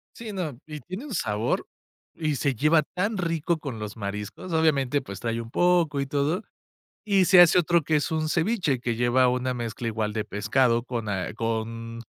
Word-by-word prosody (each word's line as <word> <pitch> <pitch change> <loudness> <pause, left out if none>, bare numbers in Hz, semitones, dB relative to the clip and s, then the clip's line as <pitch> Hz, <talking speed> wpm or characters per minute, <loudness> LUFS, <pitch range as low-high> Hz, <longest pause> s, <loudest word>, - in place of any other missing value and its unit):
Sí, 225 -3 -7
no. 155 -10 -4
Y 155 -1 -7
tiene 185 - -7
un 260 - -6
sabor, 105 - -1 0.5
y 155 -3 -1
se 135 0 0
lleva 150 +6 +4
tan 195 +7 -2
rico 165 -2 -1
con 130 -7 -6
los 105 +1 -6
mariscos. 105 - -6
Obviamente, 145 -4 +2
pues 100 -6 -8
trae 115 0 -2
un 115 +1 -10
poco, 175 -5 +2
y 140 - 0
todo. 150 +8 0 0.6
Y 195 -3 +3
se 180 -1 +8
hace 175 +1 +6
otro, 170 -1 +2
que 155 - +1
es 150 +3 0
un 155 -1 0
ceviche, 170 - +1
que 120 -1 -2
lleva 120 +2 +3
una 125 0 -1
mezcla, 115 -1 -4
igual 110 -1 -2
de 110 -1 -2
pescado, 115 +3 +1
con 115 -4 -4
a 95 -1 -2
con 115 +1 -4
135 Hz, 195 wpm, -26 LUFS, 115-165 Hz, 0.6 s, se